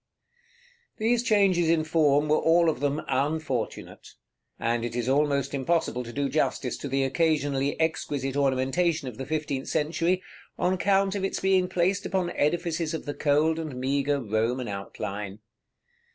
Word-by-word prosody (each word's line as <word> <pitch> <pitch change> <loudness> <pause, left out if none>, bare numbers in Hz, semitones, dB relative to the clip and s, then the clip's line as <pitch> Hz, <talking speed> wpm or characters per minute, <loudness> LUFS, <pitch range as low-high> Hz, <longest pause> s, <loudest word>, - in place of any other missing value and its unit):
§ - - -57
XIX. 480 0 -35
These 230 +2 +2
changes 195 -8 +3
in 165 -1 +3
form 150 -2 +3
were 150 - +3
all 165 0 +4
of - - -7
them 145 +1 -1
unfortunate; 135 -2 -3 0.4
and 115 0 0
it 120 0 -4
is 120 -1 -2
almost 140 0 +1
impossible 140 -2 0
to 120 - -8
do 140 +3 -1
justice 135 -4 -1
to - - -6
the 135 0 0
occasionally 145 -1 0
exquisite 145 -4 -1
ornamentation 140 +3 +1
of 125 -1 -8
the 135 - -5
fifteenth 145 -3 -2
century, 165 +4 0 0.3
on 180 - +1
account 195 +1 +2
of 200 -2 -3
its 195 - -1
being 190 -1 +2
placed 185 +2 0
upon 185 -2 -1
edifices 165 +1 0
of - - -6
the 145 - -3
cold 155 +3 +2
and 155 -5 -5
meagre 140 +2 0
Roman 115 +2 -1
outline. 100 0 -5
150 Hz, 160 wpm, -27 LUFS, 135-175 Hz, 0.4 s, all